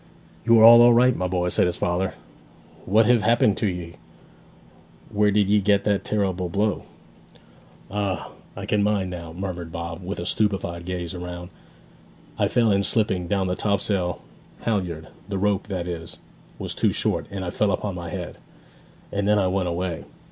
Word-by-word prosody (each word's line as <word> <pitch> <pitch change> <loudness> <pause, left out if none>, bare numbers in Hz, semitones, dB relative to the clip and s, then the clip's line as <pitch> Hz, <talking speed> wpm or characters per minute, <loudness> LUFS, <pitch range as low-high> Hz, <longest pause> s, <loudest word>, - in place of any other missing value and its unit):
'You 115 -1 +6
are - - +7
all 120 +1 +9
right, 125 +1 +4
my 90 - -1
boy!' 90 -1 0
said 90 - +2
his 90 - -2
father. 90 +2 -1 0.7
'What 110 +3 +4
hev 120 0 +4
happened 115 -3 +3
to 110 - 0
ye? 85 -3 -5 1.1
Where 105 0 +3
did 105 -1 +2
ye 105 +1 +3
get 100 0 +2
that 100 -2 +1
terrible 95 -4 -1
blow?' 100 +2 -1 1.1
'Ah 100 -2 -2 0.2
I - - -6
can 105 - +1
mind 100 -3 0
now,' 85 -2 -7
murmured 90 -1 -5
Bob, 85 +2 -6
with 95 +3 -5
a 85 - -4
stupefied 90 -5 -1
gaze 90 -1 -4
around. 90 0 -7 0.9
'I - - +3
fell 115 -3 +2
in 100 0 +3
slipping 95 -4 0
down 95 +1 0
the 90 0 -1
topsail 100 -3 -1 0.4
halyard 90 -8 -2 0.2
the 100 - -2
rope, 100 0 0
that 90 -3 -3
is, 85 -2 -6 0.4
was - - -5
too - - +1
short - - -1
and 95 -2 -5
I 90 - -3
fell 105 +2 +1
upon 100 -1 -2
my 85 -1 -6
head. - - -6 0.7
And 100 0 -1
then 105 0 +4
I 100 - +2
went 95 0 0
away. 85 -1 -3
95 Hz, 175 wpm, -24 LUFS, 90-105 Hz, 1.1 s, all